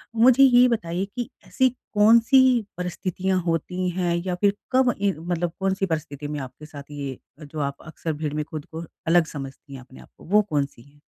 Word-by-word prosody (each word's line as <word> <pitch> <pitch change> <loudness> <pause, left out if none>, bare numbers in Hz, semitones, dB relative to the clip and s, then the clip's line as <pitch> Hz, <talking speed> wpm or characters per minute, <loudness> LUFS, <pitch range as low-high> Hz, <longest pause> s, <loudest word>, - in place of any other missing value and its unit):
मुझे 255 +4 +6
ये 250 -1 +7
बताइए 190 -5 -1
कि 245 -2 -3 0.2
ऐसी 260 0 +3 0.3
कौन-सी 230 +5 +6 0.4
परिस्थितियाँ 185 +1 -2
होती 180 +2 -1
हैं, 175 -1 0
या 180 -1 -1
फिर 200 +2 +2 0.2
कब 255 -2 +4
ए 200 -1 +3
मतलब 175 0 -2
कौन-सी 195 0 0
परिस्थिति 150 -4 -4
में 150 -1 -4
आपके 135 +3 -9
साथ 145 -1 -11
ये, 140 -3 -5 0.2
जो 150 0 -8
आप 140 -1 -3
अक्सर 160 0 -4
भीड़ 150 -1 -4
में 150 0 -1
खुद 155 -2 -7
को 165 +1 -7 0.2
अलग 170 0 +5
समझती 135 0 -8
हैं 135 - -7
अपने 130 +1 -15
आप - - -17
को, - - -16
वो 210 +5 +4
कौन-सी 140 -4 -2
है? 140 +3 -21
170 Hz, 195 wpm, -24 LUFS, 145-200 Hz, 0.4 s, ये